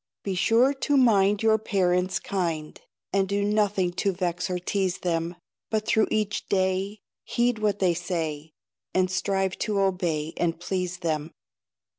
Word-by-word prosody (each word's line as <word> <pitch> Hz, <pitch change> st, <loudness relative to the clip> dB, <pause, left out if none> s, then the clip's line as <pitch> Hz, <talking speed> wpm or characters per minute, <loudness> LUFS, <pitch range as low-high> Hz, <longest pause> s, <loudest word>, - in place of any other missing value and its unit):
Be 195 Hz, -, -2 dB
sure 230 Hz, +8 st, +3 dB
to 285 Hz, +1 st, +1 dB
mind 210 Hz, -5 st, +4 dB
Your 220 Hz, 0 st, +4 dB
parents 185 Hz, -3 st, +1 dB
kind, 165 Hz, -5 st, -3 dB, 0.3 s
And 195 Hz, -1 st, +2 dB
do 200 Hz, 0 st, 0 dB
nothing 205 Hz, -4 st, +1 dB
to 200 Hz, -, +2 dB
vex 180 Hz, 0 st, -2 dB
or 180 Hz, -, -1 dB
tease 190 Hz, +1 st, -1 dB
them; 170 Hz, 0 st, -1 dB, 0.3 s
But 215 Hz, -1 st, -1 dB
through 220 Hz, -1 st, +3 dB
each 215 Hz, -1 st, -1 dB
day 190 Hz, +2 st, 0 dB, 0.2 s
Heed 240 Hz, -1 st, 0 dB
what 210 Hz, -2 st, +1 dB
they 185 Hz, -3 st, +2 dB
say, 160 Hz, -3 st, -3 dB, 0.4 s
And 185 Hz, 0 st, +2 dB
strive 190 Hz, 0 st, 0 dB
to 210 Hz, -2 st, 0 dB
obey 175 Hz, -5 st, 0 dB
and 165 Hz, -1 st, 0 dB
please 180 Hz, 0 st, -2 dB
them. 155 Hz, -2 st, -1 dB
190 Hz, 150 wpm, -26 LUFS, 175-205 Hz, 0.4 s, mind